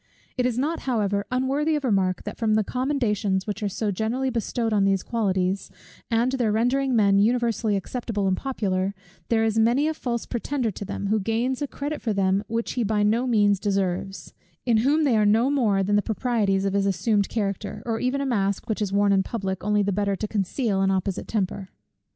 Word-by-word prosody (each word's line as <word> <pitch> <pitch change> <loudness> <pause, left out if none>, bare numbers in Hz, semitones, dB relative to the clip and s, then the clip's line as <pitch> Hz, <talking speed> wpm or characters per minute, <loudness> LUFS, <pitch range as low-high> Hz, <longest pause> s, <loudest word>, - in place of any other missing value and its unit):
It 250 -1 +1
is 245 -2 -2
not 305 +6 0
however 205 -4 0
unworthy 275 +5 +1
of 295 - -2
remark, 190 -6 +1
that - - -7
from 220 -2 +2
the 215 - +3
commendations 215 -7 -1
which 210 +1 -4
are 205 - 0
so 205 +2 -2
generally 235 +7 -1
bestowed 230 -1 -1
on 205 -2 +3
these 195 -1 +2
qualities, 195 -4 -1 0.4
and 235 +2 +2
their 245 -5 +1
rendering 250 +4 +1
men 200 -3 +4
universally 230 -1 +1
acceptable 205 0 -2
and 190 - +2
popular, 195 -6 -2 0.3
there 225 -1 +3
is 225 0 +1
many 240 +7 +3
a 315 - 0
false 240 -6 -3
pretender 245 -1 -2
to 205 - -7
them, 200 0 -5
who 215 +1 +2
gains 230 +6 -1
a 290 - -1
credit 290 +2 -5
for 220 - -1
them 195 0 +1
which 230 +1 -2
he 245 - -1
by 210 -1 +1
no 230 +5 +2
means 205 -4 +3
deserves; 195 -1 -2 0.3
in 235 -3 +3
whom 285 +8 +3
they 270 -6 +3
are 215 - +3
no 225 +6 +3
more 215 -9 +2
than 205 +2 +2
the - - +3
proprieties 210 -4 0
of 195 - 0
his 200 0 +1
assumed 200 +2 +1
character, 205 -2 -3
or 225 -2 -1
even 260 +2 0
a - - -1
mask 200 -5 -1
which 220 -2 -2
is 205 -2 -1
worn 200 0 +3
in 195 - +4
public, 190 -2 -4
only 210 0 +2
the 200 - 0
better 200 0 0
to 215 - -4
conceal 205 0 -1
an 195 - +2
opposite 190 0 -1
temper. 195 -2 -2
215 Hz, 210 wpm, -24 LUFS, 200-245 Hz, 0.4 s, men